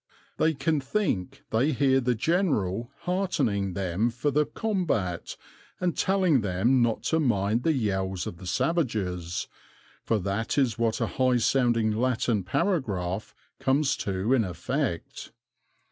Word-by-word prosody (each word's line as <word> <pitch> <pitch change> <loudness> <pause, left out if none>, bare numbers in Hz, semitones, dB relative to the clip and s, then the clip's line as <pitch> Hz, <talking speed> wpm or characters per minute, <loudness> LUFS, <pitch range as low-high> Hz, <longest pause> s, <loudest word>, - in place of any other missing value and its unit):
They 160 0 +2
can 150 +3 +1
think 135 - -2
they 130 +8 +2
hear 135 0 +3
the 125 0 +1
general 120 - 0
heartening 135 - 0
them 95 +4 0
for 125 +5 -1
the 150 +2 +2
combat 165 - -2 0.4
and 180 -2 0
telling 185 -8 +2
them 105 +7 +2
not 115 -2 +1
to 160 - +1
mind 110 -5 +1
the 160 +4 +2
yells 95 - -1
of 85 - -6
the 90 +1 -9
savages 95 - -1 0.6
for 115 - +1
that 100 +6 -2
is 125 -5 +2
what 115 -1 0
a - - +3
high 130 -2 +1
sounding 120 -2 +2
Latin 115 -2 0
paragraph 100 - -1 0.2
comes 135 +2 +2
to 100 +5 -1
in 125 -4 +4
effect. 90 - -3
120 Hz, 135 wpm, -27 LUFS, 100-145 Hz, 0.6 s, in